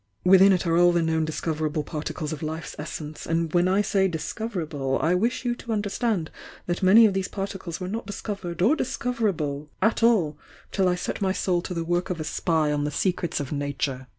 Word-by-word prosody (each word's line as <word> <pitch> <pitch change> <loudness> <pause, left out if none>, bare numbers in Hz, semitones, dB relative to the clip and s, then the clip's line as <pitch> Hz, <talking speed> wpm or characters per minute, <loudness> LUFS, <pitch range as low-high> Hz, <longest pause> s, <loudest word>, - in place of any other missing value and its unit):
Within 190 +2 +7
it 185 -1 +1
are 165 -1 +2
all 175 0 +6
the 170 -1 +2
known 160 -1 +1
discover 155 0 -2
able 150 0 -2
particles 155 +1 -4
of 150 - -7
life's 160 +1 -5
essence, 150 0 -6
and 165 -1 0
when 175 0 +4
I 195 +3 +3
say 195 -1 +2
'dis 160 -4 -4
coverable,' 160 - -2
I 165 +3 +2
wish 230 +8 0
you 240 - +1
to 235 -1 -7
understand 205 -4 -1 0.3
that 175 +2 -2
many 205 +5 +7
of 205 - +3
these 190 -1 -1
particles 195 -4 -5
were 185 - -4
not 225 +5 -4
discovered 195 -4 -4
or 255 +10 +5
discoverable 195 - -2
at 220 - +2
all 180 -11 +3 0.3
till 190 -2 +2
I 180 - +2
set 180 - -4
my 190 -1 +1
soul 180 -2 0
to 180 - -5
the 165 - -1
work 175 +1 0
of 180 -3 -3
a - - -2
spy 155 -1 0
on 145 0 0
the 150 - 0
secrets 175 +3 -1
of 140 -2 -5
Nature. 140 -2 -2
175 Hz, 215 wpm, -25 LUFS, 155-195 Hz, 0.3 s, Within